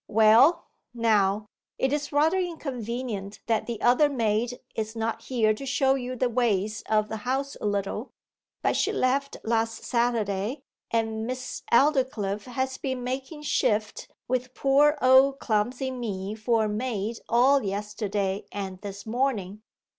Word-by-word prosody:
Well, 225 +9 +5 0.3
now, 210 -3 +2 0.3
it 265 +1 +1
is 295 0 -2
rather 315 +6 +3
inconvenient 245 - -4
that 225 -2 0
the 235 -3 -4
other 255 +5 +5
maid 235 -1 0
is 220 0 -4
not 225 0 -2
here 225 -4 +2
to 215 - -8
show 270 0 +2
you 255 -1 -3
the 255 0 +1
ways 215 -4 0
of 215 -1 +2
the 220 - -4
house 265 +5 -2
a - - -1
little, 205 +4 -2 0.5
but - - +2
she - - +1
left 275 +2 0
last 225 0 -1
Saturday, 235 +1 -1 0.3
and 225 -1 -1
Miss 255 0 -5
Aldclyffe 235 -7 +2
has 260 +1 -3
been 260 -2 -3
making 265 +4 -5
shift 215 -6 0 0.2
with 255 0 -2
poor 290 +2 +4
old 265 +2 +6
clumsy 245 +3 -1
me 210 -6 -4
for 220 +1 +1
a - - 0
maid 220 0 -3
all 265 +4 +5
yesterday 200 0 -2
and 190 -2 -5
this 200 -1 -7
morning. 220 -4 -1
235 Hz, 145 wpm, -26 LUFS, 210-260 Hz, 0.5 s, old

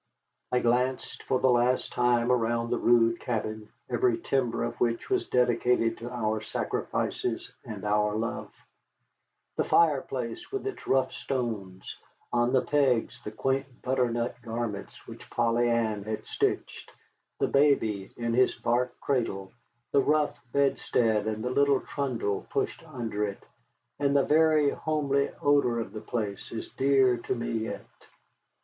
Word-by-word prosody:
I 125 - +3
glanced 125 +2 0
for 130 - 0
the 130 - +4
last 125 +1 +2
time 120 0 +2
around 115 -1 +1
the 120 - +1
rude 115 -1 +4
cabin, 110 -2 -3 0.2
every 120 -1 +2
timber 120 -1 0
of 120 - -4
which 115 - 0
was 380 -1 +1
dedicated 120 -1 +2
to 120 +1 -6
our 110 -3 -1
sacrifices 110 - -2
and - - -7
our 105 0 +2
love: 115 +2 -3 1.1
the - - +2
fireplace 130 -7 +1
with 400 -1 -3
its 405 - -5
rough 130 -1 +2
stones, 110 -8 -4 0.4
on 120 0 +2
the 130 -1 +3
pegs 135 -6 +1
the - - -4
quaint 135 -1 -2
butternut 125 -2 0
garments 115 -3 -5
which - - -11
Polly 120 0 +2
Ann 110 -3 +1
had 110 +1 -4
stitched, - - -2 0.5
the - - +2
baby 110 -9 +2
in 115 -1 -1
his 125 +2 +3
bark 125 +1 -1
cradle, 105 -8 -1 0.4
the 140 - +4
rough 150 +1 +2 0.2
bedstead 115 -5 +1
and 110 0 -2
the 125 - -1
little 140 0 +3
trundle 120 -8 -2
pushed - - -2
under 115 -8 -3
it, 100 -2 -4 0.6
and 140 0 +2
the 140 - +5
very 155 -2 +4
homely 140 -3 0
odor 140 -5 +3
of 110 -3 -5
the 110 - -6
place 110 -3 -4
is 115 - -5
dear 135 -2 +3
to 120 - -3
me 120 - -3
yet. 110 -1 -3
120 Hz, 145 wpm, -28 LUFS, 115-135 Hz, 1.1 s, the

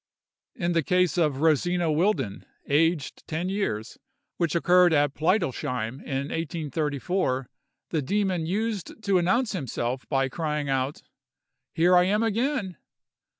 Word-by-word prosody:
In 175 -1 -1
the 165 -1 +2
case 180 0 +2
of 150 -6 +1
Rosina 165 +2 +2
Wildin, 155 - 0 0.2
aged 155 0 +1
ten 165 +4 -2
years, 150 - -3 0.4
which 170 -3 0
occurred 175 0 +5
at 145 -2 +3
Pleidelsheim, 135 - -1
in 135 +1 -3
1834, 150 -3 -2 0.4
the 160 - 0
demon 185 +1 0
used 215 +2 -3
to 200 -2 +3
announce 215 +8 +1
himself 130 - -3
by 135 -2 +2
crying 150 0 -2
out, 135 +1 -1 0.7
"Here 175 +2 +4
I 180 0 +6
am 210 +4 +2
again!" 225 - -1
165 Hz, 125 wpm, -26 LUFS, 140-185 Hz, 0.7 s, I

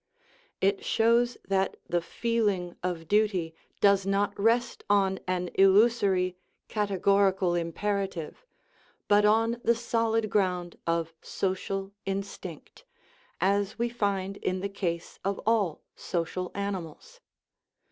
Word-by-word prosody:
It 195 +1 +2
shows 235 +2 +2
that 195 -1 0
the 175 0 0
feeling 205 -3 -1
of 175 -3 -3
duty 200 -5 +1 0.3
does 200 -1 +5
not 200 +1 +1
rest 230 +3 +1
on 195 -2 +3
an 180 -1 -1
illusory 195 -2 +4 0.2
" - - -49
categorical 195 -2 +2
imperative," 185 0 -2 0.6
but 205 0 +5
on 225 +3 +3
the 235 - +4
solid 225 -2 0
ground 180 -4 0
of 165 -1 0
social 195 +1 -3 0.2
instinct, 195 - -6 0.6
as 200 +1 +1
we 235 0 0
find 200 -4 -1
in 185 0 -2
the 200 - -2
case 175 -4 -4
of 195 0 -1
all 210 -8 +1
social 180 +1 -3
animals. 200 - -5
195 Hz, 115 wpm, -28 LUFS, 185-210 Hz, 0.6 s, does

